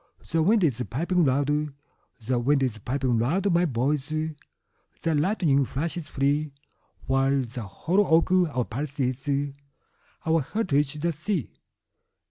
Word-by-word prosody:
The 165 - +2
wind 205 +5 +4
is 130 -7 +1
piping 170 +7 +1
loud; 140 +2 +2 0.7
The 125 +1 +1
wind 135 +3 +2
is 115 -5 -1
piping 125 +1 0
loud, 175 - +1
my 175 +1 +4
boys, 135 +1 0
The 155 +1 -5
lightning 150 -3 +2
flashes 155 +5 -3
free—While 140 -1 -1
the 120 -3 -7
hollow 180 - +1
oak 165 +3 +3
our 160 -10 +2
palace 140 +5 -5
is, 140 +2 -1 0.7
Our 160 0 +3
heritage 145 - 0
the 170 +3 -1
sea. 165 - -3
145 Hz, 125 wpm, -26 LUFS, 130-165 Hz, 0.7 s, wind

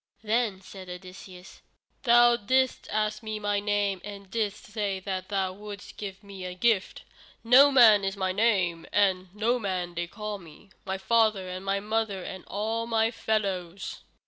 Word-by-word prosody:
Then 220 -3 0
said 190 -1 -11
Odysseus: 180 +1 -11 0.4
"Thou 240 -1 +6
didst 255 +4 +1
ask 215 +1 -1
me 215 -1 -4
my 205 -1 0
name, 205 -2 0
and 200 -2 -9
didst 215 0 -2
say 210 -4 -2
that 185 -1 -4
thou 190 -2 -1
wouldst 205 0 -10
give 195 -1 -7
me 200 -2 -9
a 180 0 -5
gift. 215 -1 +1 0.4
Noman 245 -4 +7
is 195 +1 -2
my 190 -1 0
name, 185 -5 +1
and 190 -2 +2
Noman 200 -6 -1
they 170 0 -3
call 210 +2 -6
me, 170 +3 -16
my 190 0 -2
father 215 -1 +2
and 185 +1 -6 0.2
mother 215 -4 -1
and 190 0 -7
all 225 +3 -2
my 225 -1 +2
fellows." 195 -5 -2
205 Hz, 150 wpm, -27 LUFS, 190-220 Hz, 0.4 s, Noman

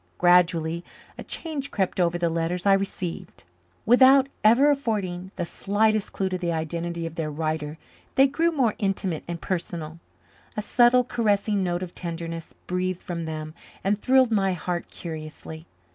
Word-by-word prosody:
Gradually 170 -2 +3 0.3
a - - -8
change 300 -5 -5
crept 190 -2 -1
over 175 -1 +2
the 175 0 +1
letters 170 +2 -2
I 200 - +6
received. 190 -2 -3 0.4
Without 260 +3 +6 0.2
ever 245 +7 +6
affording 200 -9 -2
the 175 - -2
slightest 215 +3 +1
clue 195 - -1
to 185 -1 -3
the 175 -1 -1
identity 170 +1 -3
of 165 - -5
their 160 -2 -3
writer 155 0 -3 0.4
they 270 - +7
grew 330 +5 +1
more 255 -9 +2
intimate 195 -5 -1
and 170 -1 -4
personal. 170 -3 -4 0.6
A - - 0
subtle, 245 +2 +5
caressing 210 -4 +1
note 175 0 -1
of 180 - -7
tenderness 165 -1 -6
breathed 180 0 -1
from 170 -2 -4
them 155 -1 -5 0.3
and 200 +2 +2
thrilled 255 +3 +3
my 195 -3 +2
heart 175 0 -4
curiously. 160 0 -8
180 Hz, 155 wpm, -25 LUFS, 165-215 Hz, 0.6 s, they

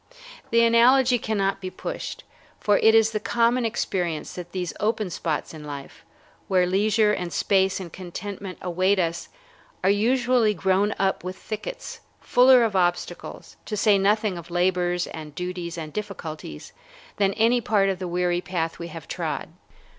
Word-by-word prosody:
The 230 0 +4
analogy 245 +2 +5
cannot 195 -3 -1
be 185 - -4
pushed, - - -6 0.4
for 205 -1 +3
it 220 0 +5
is 225 0 +5
the 215 - -1
common 235 +2 +1
experience 180 -7 -2
that 175 -1 -8
these 180 -2 -3
open 215 -2 -1
spots 160 -2 -3
in 155 -1 -9
life, 145 -2 -9 0.4
where 185 -1 +3
leisure 210 +3 +2
and 180 -3 -3
space 190 +1 +2
and 175 -4 -8
contentment 190 +1 -7
await 185 +3 +1
us, 170 -1 -1 0.5
are 195 - +4
usually 235 +1 +2
grown 190 +3 +1
up 195 -2 0
with 185 +1 -5
thickets, - - -6 0.2
fuller 250 0 +5
of 220 -3 0
obstacles, 175 -1 -2
to 210 - -3
say 205 -1 +4
nothing 205 -1 +1
of 170 - -12
labors 175 0 +1
and 155 -2 -9
duties 180 -1 -5
and 155 -2 -6
difficulties, 160 - -7 0.4
than 200 -1 +2
any 235 +2 +3
part 210 -3 +2
of 190 -2 -1
the 185 - -4
weary 175 0 0
path 165 -3 -3
we 170 - -5
have 165 -3 -9
trod. - - -4
190 Hz, 160 wpm, -24 LUFS, 175-215 Hz, 0.5 s, analogy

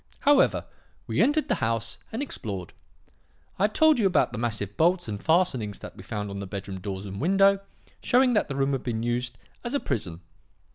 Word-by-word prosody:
"However, 285 -1 +4 0.4
we - - 0
entered 300 +2 +3
the - - 0
house 115 0 -1
and 230 +6 -2
explored. 100 - -6 0.9
I 195 - +4
have 215 - -1
told 315 -4 +5
you 205 - +4
about 180 - +2
the 120 - -5
massive 110 -4 -2
bolts 175 0 +2
and 105 -2 -5
fastenings 130 - +2
that - - -9
we - - -11
found 105 0 -4
on 100 - -5
the 100 - -5
bedroom 95 -1 -6
doors 95 0 -5
and 100 +2 -6
window, 195 +4 +4 0.4
showing 250 0 +4
that 210 - +2
the 135 - -4
room 135 0 +1
had 135 -2 -1
been 115 -2 -3
used 120 +1 -2 0.3
as 240 +3 -2
a - - +2
prison. 90 - -4
120 Hz, 200 wpm, -26 LUFS, -, 0.9 s, told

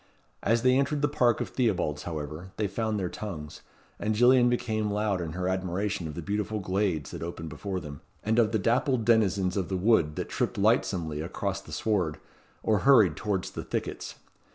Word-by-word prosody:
As 115 +2 +2
they 130 0 +5
entered 145 +1 0
the - - +5
park 125 -5 +2
of - - -3
Theobalds, 90 - 0
however, 80 +2 -5
they 110 - 0
found 110 +1 -1
their 95 - -1
tongues, 85 -7 -7 0.4
and 110 +1 0
Gillian 125 +2 +6
became 110 -3 0
loud 105 -2 0
in 80 -2 -4
her 90 +1 -2
admiration 95 0 -1
of 75 - -7
the 85 - -5
beautiful 105 +2 -2
glades 95 -6 -1
that - - -7
opened 85 -1 -5
before 95 +5 -4
them, 75 -4 -9 0.2
and 110 +2 +2
of 110 -2 +3
the 110 - +2
dappled 120 +3 +1
denizens 100 -5 +3
of 95 -4 -1
the 95 - -1
wood 90 -7 +3
that - - -3
tripped - - -1
lightsomely 80 -4 +1
across 95 +3 -3
the - - -13
sward, 100 -9 0 0.5
or 110 -2 +2
hurried 110 - +6
towards 100 -2 -2
the - - -5
thickets. - - -4
100 Hz, 190 wpm, -28 LUFS, 85-110 Hz, 0.5 s, Gillian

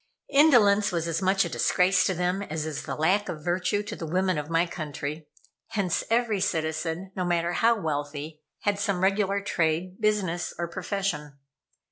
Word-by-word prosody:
Indolence 225 -9 +5
was 170 -2 -1
as 165 +2 -1
much 195 +1 +3
a - - -3
disgrace 180 0 +3
to 190 - 0
them 180 +3 0
as 160 -5 -4
is 155 -3 -4
the - - -3
lack 190 +7 +1
of 155 -2 -6
virtue 185 +4 0
to - - -6
the 165 - -6
women 185 0 +1
of 150 +1 -6
my 165 +1 +2
country, 150 -2 -5 0.4
hence 195 -5 -1
every 230 -3 +2
citizen, 160 +3 -2
no 185 - -1
matter 175 -1 0
how 230 +4 +3
wealthy, 150 -1 -4 0.2
had 205 -1 0
some 200 -3 0
regular 200 0 +2
trade, 180 +1 -1
business 190 -5 0
or 170 - -2
profession. 170 -6 -3
180 Hz, 170 wpm, -27 LUFS, 160-200 Hz, 0.4 s, Indolence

